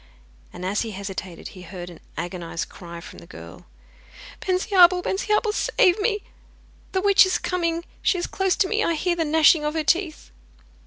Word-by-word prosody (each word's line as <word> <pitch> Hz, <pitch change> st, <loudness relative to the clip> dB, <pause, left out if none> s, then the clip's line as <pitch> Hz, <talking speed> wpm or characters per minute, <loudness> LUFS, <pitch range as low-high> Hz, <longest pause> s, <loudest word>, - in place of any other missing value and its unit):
And 180 Hz, -, -8 dB
as 195 Hz, +2 st, 0 dB
he 225 Hz, -2 st, -4 dB
hesitated 190 Hz, -2 st, -7 dB
he 185 Hz, -, -12 dB
heard 175 Hz, 0 st, -8 dB
an 170 Hz, -, -13 dB, 0.2 s
agonised 175 Hz, -2 st, -5 dB
cry 170 Hz, -1 st, -10 dB
from 85 Hz, -, -11 dB
the 85 Hz, -, -15 dB
girl: 85 Hz, -2 st, -12 dB, 0.7 s
'Bensiabel, 365 Hz, -1 st, +4 dB
Bensiabel, 425 Hz, +3 st, 0 dB
save 370 Hz, -2 st, +2 dB
me! 420 Hz, -1 st, 0 dB, 0.7 s
The 375 Hz, -, 0 dB
witch 400 Hz, 0 st, +6 dB
is 375 Hz, -, +1 dB
coming, 340 Hz, -2 st, -2 dB, 0.2 s
she 370 Hz, -, +2 dB
is 350 Hz, -, -2 dB
close 385 Hz, -1 st, 0 dB
to 375 Hz, -, +2 dB
me, 435 Hz, +2 st, 0 dB
I 335 Hz, -, +1 dB
hear 350 Hz, +2 st, 0 dB
the 330 Hz, -1 st, -1 dB
gnashing 310 Hz, 0 st, +5 dB
of 300 Hz, +1 st, -2 dB
her 320 Hz, -, 0 dB
teeth! 335 Hz, 0 st, -1 dB
330 Hz, 175 wpm, -23 LUFS, -, 0.7 s, witch